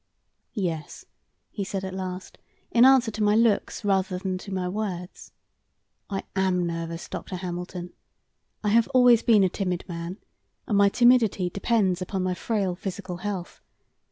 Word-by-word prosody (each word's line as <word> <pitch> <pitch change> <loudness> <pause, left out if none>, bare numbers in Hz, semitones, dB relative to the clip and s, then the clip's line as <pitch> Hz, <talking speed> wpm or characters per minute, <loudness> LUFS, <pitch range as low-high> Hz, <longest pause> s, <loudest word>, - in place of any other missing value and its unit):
"Yes," 165 -7 -4 0.5
he 205 - -3
said 195 0 -4
at 190 - -5
last, 185 0 -6 0.3
in 240 +1 +6
answer 260 -3 +5
to 215 - -5
my 210 0 +4
looks 225 -1 +1
rather 190 -2 +1
than 185 0 -3
to 200 - -9
my 185 -1 -2
words, 185 -2 -5 0.8
"I 195 -2 -3
AM 185 -2 +1
nervous, 165 0 -4
Dr. 185 - -6
Hamilton. 180 0 -6 0.7
I 210 - +1
have 230 +2 +4
always 245 -2 +6
been 215 -4 +5
a - - +5
timid 180 -1 -3
man, 170 +1 -5 0.5
and 210 - -1
my 200 0 +5
timidity 225 -6 +3
depends 195 -3 +1
upon 185 +1 -2
my 185 0 0
frail 195 0 -1
physical 185 -1 -6
health. 190 -1 -5
190 Hz, 155 wpm, -26 LUFS, 180-210 Hz, 0.8 s, in